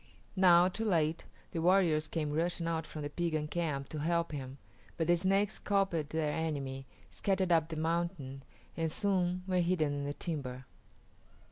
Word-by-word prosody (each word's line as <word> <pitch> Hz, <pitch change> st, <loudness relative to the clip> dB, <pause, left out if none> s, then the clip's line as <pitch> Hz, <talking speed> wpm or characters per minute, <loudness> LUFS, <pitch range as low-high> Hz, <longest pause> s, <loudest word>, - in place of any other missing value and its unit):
Now, 180 Hz, -2 st, +6 dB
too 190 Hz, +4 st, -2 dB
late, 165 Hz, -5 st, +1 dB, 0.3 s
the 165 Hz, -, -2 dB
warriors 170 Hz, -4 st, +3 dB
came 150 Hz, -1 st, -2 dB
rushing 170 Hz, +2 st, 0 dB
out 165 Hz, -1 st, -1 dB
from 155 Hz, -, -6 dB
the 145 Hz, -, -3 dB
Piegan 155 Hz, -2 st, -1 dB
camp 150 Hz, -5 st, -1 dB
to 155 Hz, -, -5 dB
help 170 Hz, +2 st, 0 dB
him, 135 Hz, -2 st, -6 dB, 0.4 s
but 165 Hz, -, +1 dB
the 175 Hz, +2 st, +4 dB
Snakes 195 Hz, +4 st, +1 dB
scalped 190 Hz, -7 st, 0 dB
their 160 Hz, -2 st, 0 dB
enemy, 135 Hz, -4 st, -3 dB, 0.2 s
scattered 190 Hz, -2 st, 0 dB
up 165 Hz, -1 st, +3 dB
the 160 Hz, -, -4 dB
mountain, 160 Hz, -4 st, -2 dB, 0.3 s
and 165 Hz, -1 st, -1 dB
soon 185 Hz, -2 st, 0 dB
were 185 Hz, -1 st, +1 dB
hidden 170 Hz, -4 st, +1 dB
in 140 Hz, 0 st, -3 dB
the 145 Hz, 0 st, -3 dB
timber. 135 Hz, -6 st, -4 dB
165 Hz, 165 wpm, -32 LUFS, 150-180 Hz, 0.4 s, Now